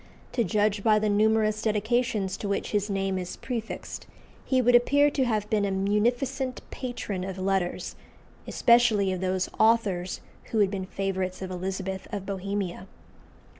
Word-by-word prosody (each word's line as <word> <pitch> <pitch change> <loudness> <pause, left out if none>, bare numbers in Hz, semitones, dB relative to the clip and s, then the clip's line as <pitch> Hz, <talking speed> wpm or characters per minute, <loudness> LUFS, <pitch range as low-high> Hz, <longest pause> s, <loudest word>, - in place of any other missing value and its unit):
To 235 - +1
judge 205 +1 +1
by 215 -1 +5
the 215 0 +1
numerous 215 +1 +2
dedications 215 -2 0
to 205 - -4
which 200 - -2
his 205 0 0
name 195 -1 -1
is 180 -1 -6
prefixed, 235 -3 -5 0.4
he 260 - +1
would 245 0 +4
appear 285 +4 +5
to 270 -2 +1
have 215 -3 0
been 210 -2 +2
a 200 - +1
munificent 240 +7 0
patron 225 -7 -4
of 190 0 -5
letters, 190 -1 -1 0.5
especially 235 -5 +4
of 185 -1 -3
those 185 0 0
authors 205 -6 +2 0.2
who 225 - -3
had 200 -2 +3
been 190 -2 -3
favourites 190 -1 -3
of 185 - -5
Elizabeth 190 +1 -4
of 200 -3 -4
Bohemia. 195 -1 -3
205 Hz, 155 wpm, -27 LUFS, 190-225 Hz, 0.5 s, by